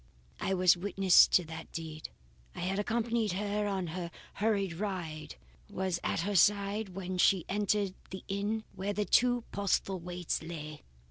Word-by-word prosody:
"I 190 - 0
was 185 -1 +5
witness 190 0 +5
to 180 - +3
that 160 0 -8
deed. 160 -1 -6 0.5
I - - -6
had 190 +3 -1
accompanied 225 -1 0
her 205 +2 -1
on 195 -2 -1
her 170 +1 -4 0.2
hurried 200 -4 0
ride 165 -5 -4 0.3
and 205 - -13
was 185 -2 0
at - - 0
her 200 +3 -2
side 200 0 +2
when 185 -1 -4
she 185 -1 +4
entered 205 -1 0 0.2
the 190 - -7
inn 205 +3 -2
where 195 +2 -3
the 210 0 -1
two 245 +1 +3
Postlethwaites 180 -3 -1
lay. 155 -2 -7
190 Hz, 155 wpm, -31 LUFS, 175-205 Hz, 0.5 s, was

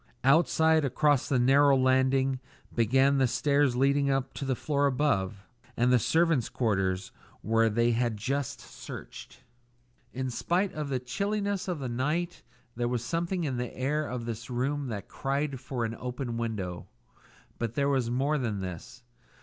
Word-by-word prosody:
Outside, 160 +2 +4
across 145 +1 +2
the 135 - +2
narrow 135 +3 +5
landing, 130 0 +2 0.3
began 135 +4 +3
the 130 - +4
stairs 140 +1 +2
leading 140 +2 +2
up 135 -1 0
to 140 - -5
the 130 -1 0
floor 145 +2 +1
above, 105 -8 0 0.3
and 125 +2 +3
the 125 - +5
servants' 160 0 +2
quarters 95 -5 -1 0.3
where 115 +1 +3
they 115 +2 +2
had 120 -1 0
just 135 +5 -2
searched. - - -10 0.7
In 130 0 -3
spite 180 - 0
of 150 -2 -4
the 135 - 0
chilliness 200 +9 -2
of 180 -3 -2
the 135 -3 -4
night 150 +9 -2 0.3
there 120 0 -1
was 120 -1 -1
something 170 +3 -1
in 135 -5 -2
the 125 -1 -4
air 145 +4 0
of 125 -2 -4
this 115 0 -6
room 135 +3 -1
that 105 -5 -5
cried 140 0 -2
for 130 -2 -3
an 115 - -3
open 125 0 -5
window. 105 -7 -4 0.7
But 115 -1 -3
there 140 0 +1
was 130 -4 +1
more 140 +5 +1
than 110 -6 -2
this. 95 +6 -7
130 Hz, 160 wpm, -29 LUFS, 120-145 Hz, 0.7 s, narrow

